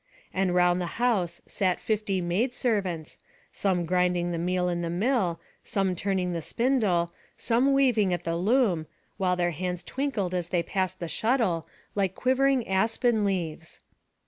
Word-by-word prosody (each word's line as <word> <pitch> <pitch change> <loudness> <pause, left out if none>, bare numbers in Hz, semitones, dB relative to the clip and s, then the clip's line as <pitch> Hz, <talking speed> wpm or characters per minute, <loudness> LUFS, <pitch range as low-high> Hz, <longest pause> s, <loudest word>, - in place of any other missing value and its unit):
And 185 -2 +1
round 180 0 +3
the 175 - -2
house 200 -8 0
sat 185 -2 0
fifty 210 -3 -1
maid 200 +9 0
servants, 190 -9 -1 0.3
some 180 -3 0
grinding 180 0 +1
the 170 - -2
meal 180 +1 0
in 175 -1 -1
the 170 - -2
mill, 185 -2 +1 0.2
some 195 -2 0
turning 185 -1 -1
the 170 - -2
spindle, 205 - +1 0.2
some 250 +4 +2
weaving 245 -8 +3
at 175 - -1
the 165 0 -1
loom, 185 -4 +2 0.3
while 185 -2 +1
their 175 -1 +1
hands 180 +1 -3
twinkled 240 -7 -2
as 175 -2 -2
they 175 -2 +1
passed 190 -1 -2
the 170 - -4
shuttle, 220 -5 0 0.3
like 195 -2 0
quivering 260 -1 +2
aspen 220 +3 +1
leaves. 175 -6 -3
185 Hz, 155 wpm, -27 LUFS, 175-225 Hz, 0.3 s, round